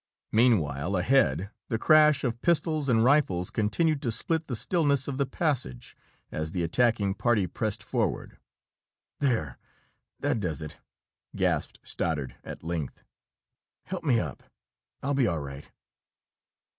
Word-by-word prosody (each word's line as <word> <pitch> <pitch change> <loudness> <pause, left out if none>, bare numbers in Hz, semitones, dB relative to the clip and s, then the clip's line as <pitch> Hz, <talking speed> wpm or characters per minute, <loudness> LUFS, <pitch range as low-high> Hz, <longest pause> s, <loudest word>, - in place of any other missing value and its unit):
Meanwhile, 100 - +2
ahead, 95 - +2 0.2
the 115 - 0
crash 150 +2 +5
of 120 -2 -2
pistols 155 -3 +1
and 115 -2 +4
rifles 120 -10 +2
continued 140 +8 +1
to 120 - -1
split 160 +7 -1
the 125 - -2
stillness 140 +1 +1
of 135 -2 -3
the 140 - +1
passage, 130 - -2 0.4
as 80 +1 -3
the 90 - -1
attacking 105 +2 +2
party 110 -2 +2
pressed 90 - -3
forward. - - -2 0.8
"There 115 - 0 0.6
that - - 0
does 85 -5 -2
it!" 75 - -8 0.6
gasped - - 0
Stoddard, 75 -6 -2
at - - -8
length. 80 -4 -4 0.8
"Help 185 -2 -5
me 130 -7 +3
up. 75 - -5 0.6
I'll 140 +1 0
be 135 -4 +3
all 85 -5 0
right." 70 0 -8
115 Hz, 130 wpm, -28 LUFS, 85-140 Hz, 0.8 s, crash